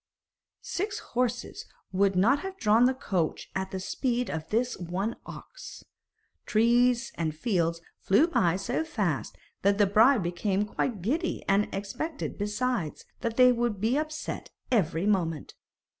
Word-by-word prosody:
Six 400 +3 -3 0.2
horses 245 0 -2 0.2
would 195 0 +2
not 230 +10 +4
have 380 +3 -6
drawn 220 - +4
the 260 +1 +2
coach 185 -10 -2
at 190 0 -2
the 190 - -4
speed 245 +5 -1
of 160 -1 -5
this 240 +3 0
one 185 +6 -3
ox. - - -10 0.6
Trees 240 +3 +3
and 160 -2 -1
fields 170 -2 0 0.2
flew 205 +11 +4
by 180 - +2
so 235 +10 -1
fast 205 - -2 0.2
that 200 +1 +3
the 205 - +5
bride 220 +3 +5
became 190 +4 0
quite 210 -2 -2
giddy, 320 - -1
and 200 +2 +2
expected, 250 +12 -4
besides, 210 -4 -2
that 230 -2 -3
they 250 -1 +7
would 235 -4 0
be 225 +5 +1
upset 310 +1 -3 0.2
every 180 -6 +1
moment. 170 -7 0
215 Hz, 145 wpm, -28 LUFS, 190-250 Hz, 0.6 s, they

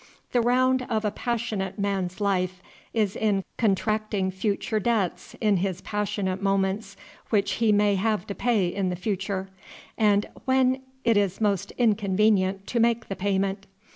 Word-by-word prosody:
The 245 - +3
round 255 +2 +3
of 220 -2 0
a 210 - +1
passionate 215 -4 -2
man's 195 -2 -2
life 185 -2 0 0.3
is 210 -4 0
in 205 -3 +1 0.2
contracting 215 -2 +1
future 205 +3 -1
debts 210 -4 -1
in 210 -3 +3
his 185 0 -2
passionate 200 -2 -2
moments 195 +1 0 0.3
which 205 -3 +2
he 225 -2 +4
may 205 0 +4
have 205 -1 0
to 200 - -5
pay 220 -5 +1
in 185 +1 -1
the 180 - -2
future, 195 0 -3 0.5
and 205 -1 +4 0.2
when 260 0 +3 0.2
it 230 -3 +3
is 195 -2 +1
most 205 -4 0
inconvenient 200 -3 +2
to 235 - -1
make 230 0 +2
payment. 195 0 -1
205 Hz, 145 wpm, -26 LUFS, 190-220 Hz, 0.5 s, he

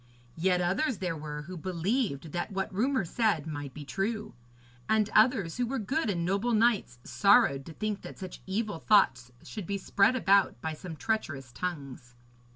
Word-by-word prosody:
Yet 180 +1 +2
others 195 - 0
there 180 -3 -2
were 150 -1 -6
who 185 +4 -8
believed 180 - -2
that 175 +5 -3
what 195 +1 -3
rumour 255 +2 +1
said 195 -5 +1
might 145 -3 -5
be 150 +2 -9
true; 210 +7 -3 0.6
and 215 -1 +3
others, 215 -7 +3
who 245 -1 0
were 270 +3 -2
good 265 +5 -1
and 170 -4 -1
noble 200 +6 0
knights, 215 - +2
sorrowed 200 - +3
to 165 - -8
think 210 +3 -3
that - - -10
such 185 -3 -8
evil 205 -2 -2
thoughts 130 - +3
should 210 -7 -7
be 200 - -1
spread 200 +4 +3
about 200 - +3
by 160 +4 -3
some 165 +1 -8
treacherous 150 - -2
tongues. 135 -7 -6
190 Hz, 170 wpm, -29 LUFS, 160-215 Hz, 0.6 s, and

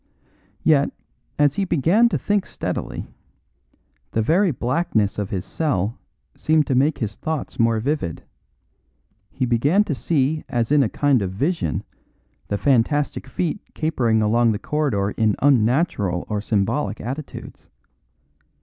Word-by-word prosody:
Yet, 145 -3 +3 0.5
as 145 -2 +4
he 200 - -1
began 185 - +3
to - - 0
think 205 -2 0
steadily, - - -4 1.1
the 110 - +2
very 180 - +3
blackness 120 - 0
of 100 -1 -3
his 95 -1 -3
cell 120 - -1 0.4
seemed 155 -1 +2
to 135 - -1
make 140 +4 +2
his 110 -3 -3
thoughts 160 -4 -4
more 115 -1 +3
vivid; 125 - -2 1.1
he 130 - -2
began 140 - +3
to 160 - -2
see 150 +1 0
as 120 +1 -1
in 150 -1 +5
a 120 - +2
kind 140 -2 +2
of 95 - -1
vision 135 - -1 0.6
the 100 - -1
fantastic 140 +4 +1
feet 170 +8 -2
capering 120 -9 +1
along 115 +1 +3
the - - -2
corridor 115 -7 -1
in 110 -1 +1
unnatural 120 - +2
or 105 -1 -2
symbolic 110 +6 -1
attitudes. 135 +6 -7
130 Hz, 135 wpm, -22 LUFS, 110-155 Hz, 1.1 s, in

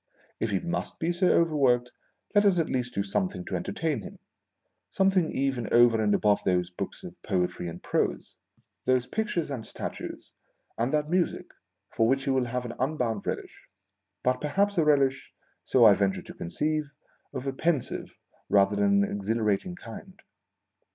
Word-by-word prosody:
If 115 - 0
he 100 -2 +1
must 170 0 -4
be 165 +1 0
so 180 +1 +2
overworked, 135 -7 +3 0.4
let 205 0 +5
us 195 -3 +4
at 165 - 0
least 125 -1 -2
do 100 - +1
something 95 -2 -2
to - - -3
entertain 145 - -2
him - - -10 0.4
— - - -54 0.3
something 190 -3 +2
even 135 -4 -1
over 120 -2 +5
and 105 -1 +3
above 105 -1 +2
those 90 -1 +1
books 90 - -6
of - - -8
poetry 90 -1 -1
and 85 +1 -8
prose, - - -1 0.5
those 130 -1 +2
pictures 180 - -2
and 125 -5 -4
statues, - - -7 0.4
and 120 +3 -1
that 150 -1 +1
music, 175 +2 -1 0.4
for 115 - +2
which 135 +2 +2
he 135 - 0
will 130 -1 +2
have 125 +1 -3
an 115 - -5
unbounded 125 -6 -1
relish, - - -5 0.6
but 125 0 +1
perhaps 200 +7 +1
a - - +4
relish 135 -3 +2 0.3
(so 125 -3 +4
I 105 - +9
venture 100 -1 0
to - - -10
conceive) 150 - -2 0.4
of 130 -1 -5
a 135 - -1
pensive 155 -1 -2 0.3
rather 100 0 +4
than 100 0 +3
an - - -2
exhilarating 105 - -1
kind. 185 - -11
125 Hz, 170 wpm, -27 LUFS, 105-155 Hz, 0.6 s, I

